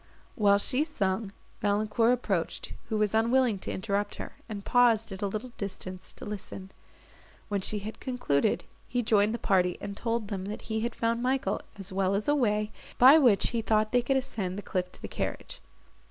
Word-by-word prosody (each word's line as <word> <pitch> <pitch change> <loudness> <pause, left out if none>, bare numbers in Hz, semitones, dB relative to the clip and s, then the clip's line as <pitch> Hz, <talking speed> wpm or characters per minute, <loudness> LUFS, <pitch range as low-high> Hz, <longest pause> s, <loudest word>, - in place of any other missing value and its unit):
While 200 -3 +4
she 255 +7 +4
sung, 200 - -2 0.3
Valancourt 215 +3 +2
approached, 205 -9 -1 0.2
who 220 - 0
was 210 -1 +1
unwilling 230 -1 +3
to - - -4
interrupt 205 +1 -2
her, - - -7 0.2
and 205 -2 -6
paused 230 -3 +4
at 190 +1 -7
a 200 - +1
little 215 +5 -5
distance 185 -2 -6
to - - -9
listen. 195 -2 -7 0.8
When 200 -1 0
she 210 - 0
had 210 +2 -6
concluded, 235 - 0 0.2
he 245 -1 -1
joined 210 -1 +3
the 235 - -2
party, 180 -5 +2
and 200 0 -6
told 230 -1 -2
them, 190 -3 -4
that 210 +2 -6
he 220 -1 -2
had 235 +1 -2
found 230 0 0
Michael, 260 +2 0 0.2
as 195 -1 -2
well 195 0 +1
as 205 - -2
a 290 - +4
way, 215 -6 +1 0.3
by 270 +6 +9
which 240 -9 +4
he 230 -1 -1
thought 215 -1 +1
they 245 - +4
could 270 +3 +1
ascend 205 -8 -3
the 205 - -5
cliff 180 -2 -2
to - - -14
the - - -3
carriage. - - -5
215 Hz, 195 wpm, -29 LUFS, 200-235 Hz, 0.8 s, by